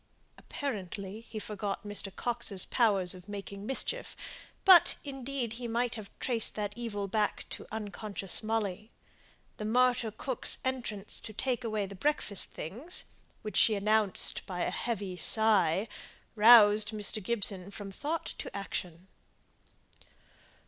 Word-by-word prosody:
Apparently, 205 -5 -5
he 220 - -7
forgot 205 -1 -4
Mr. 205 -1 0
Coxe's 225 -6 +1
powers 200 -7 +2
of 185 +2 -13
making 200 0 -7
mischief; - - -2 0.5
but 370 -4 +8
indeed 270 -4 -4
he 240 +1 -5
might 235 +1 0
have 215 -3 -7
traced 235 -4 +1
that 205 -1 -3
evil 215 -4 -4
back 210 +1 -1
to - - -6
the - - -22
unconscious 205 -2 -2
Molly. 215 -2 -2 0.7
The 210 - -5
martyr 245 +1 +3
cook's 240 +4 -1
entrance 230 -6 -2
to 215 - -9
take 250 +2 -1
away 215 -3 -1
the 195 - -9
breakfast 210 -2 +1
things, 245 - -4 0.4
which 215 - -4
she 220 - +5
announced 210 0 +1
by 180 -2 -4
a - - -1
heavy 200 -6 -3
sigh, 210 -3 +3 0.5
roused 215 -1 +7
Mr. 215 0 -1
Gibson 200 -3 -1
from 200 0 -8
thought 310 +11 -3
to - - -6
action. 180 -2 -5
215 Hz, 135 wpm, -31 LUFS, 200-235 Hz, 0.7 s, but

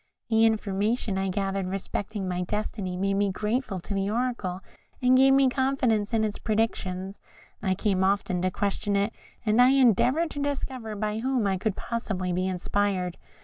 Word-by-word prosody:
The 225 0 +5
information 210 -1 0
I 190 0 -1
gathered 195 0 -1
respecting 195 +1 -3
my 180 0 -1
destiny 195 -1 -3
made 195 +1 0
me 200 0 +1
grateful 210 0 -2
to 200 - -5
the 195 0 0
Oracle, 220 -6 -2 0.4
and 255 0 +4
gave 270 +1 +6
me 275 -1 +5
confidence 255 -5 +1
in 225 -2 +2
its 215 -1 -2
predictions. 195 -3 -2 0.4
I 190 -3 +1
came 190 -1 +1
often 190 -2 +1
to 185 - +2
question 200 +1 -1
it, 200 +3 +1 0.3
and 215 +3 +4
I 250 - +7
endeavoured 270 - +3
to 285 - -5
discover 260 -6 -3
by 210 +1 -2
whom 255 -2 0
it 190 -2 0
could 215 -3 0
possibly 195 -6 -3
be 185 +1 0
inspired. 185 -1 -1
205 Hz, 170 wpm, -27 LUFS, 190-230 Hz, 0.4 s, I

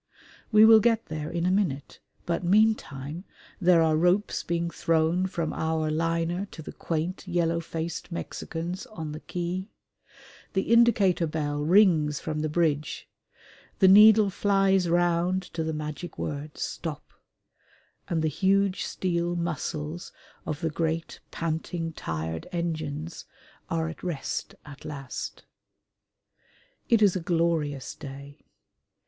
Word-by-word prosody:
We 215 0 +8
will 225 0 +9
get 230 +1 +2
there 155 0 -4
in 170 0 -2
a 180 - +2
minute, 175 -8 -1 0.3
but 170 +1 -1
meantime 175 -6 +1 0.4
there 175 -3 +5
are 160 -1 +3
ropes 180 +6 +2
being 170 0 -2
thrown 165 +3 +1
from 170 -4 -3
our 160 -1 -1
liner 165 +4 -1
to 160 - -9
the - - -7
quaint 170 +4 -3
yellow 170 -2 +1
faced 165 +1 -5
Mexicans 170 +2 -5
on 160 -7 -6
the 155 - -6
quay; 180 +4 -4 0.8
the 190 - +1
indicator 205 -7 +4
bell 150 -2 -2
rings 160 -4 +4
from 155 -1 -3
the 155 0 -1
bridge, 155 -2 -1 0.7
the 190 - +5
needle 210 +1 +8
flies 195 -2 +2
round 175 +2 +2
to 165 -1 -2
the 160 - -2
magic 155 +2 -6
word 150 +1 -5
"Stop," 160 -4 -5 0.9
and 165 -2 -1
the - - +2
huge 195 +3 +1
steel 175 -1 -1
muscles 165 -1 -4 0.4
of 150 - -3
the 165 - -1
great 160 +1 -2
panting, 165 0 -3
tired 80 - -4
engines 160 -2 -4 0.4
are 165 -1 0
at 165 - -8
rest 170 -7 -4
at 145 -2 -12
last. 135 -3 -6 1.5
It 230 -2 +5
is 195 -3 +4
a - - 0
glorious 165 -5 0
day. 140 +1 -10
165 Hz, 130 wpm, -27 LUFS, 155-185 Hz, 1.5 s, will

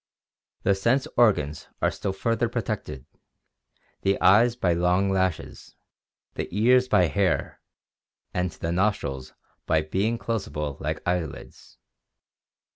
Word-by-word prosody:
The 100 - +3
sense 115 +8 +1
organs 80 -11 +2
are - - +1
still 100 - -3
further 115 +4 -1
protected, 110 - -4 1.0
the 95 0 +1
eyes 115 +5 +5
by 90 -8 +1
long 90 +3 +2
lashes, 95 -4 -2 0.6
the - - -4
ears 125 +6 +3
by 100 -7 +4
hair, 90 +5 -1 0.7
and 90 0 0
the 85 0 -5
nostrils 85 -9 -1 0.3
by 80 -1 +2
being 100 +9 -1
closable 75 -12 -4
like 75 +2 -3
eyelids. 90 -5 -4
95 Hz, 115 wpm, -25 LUFS, 80-110 Hz, 1.0 s, eyes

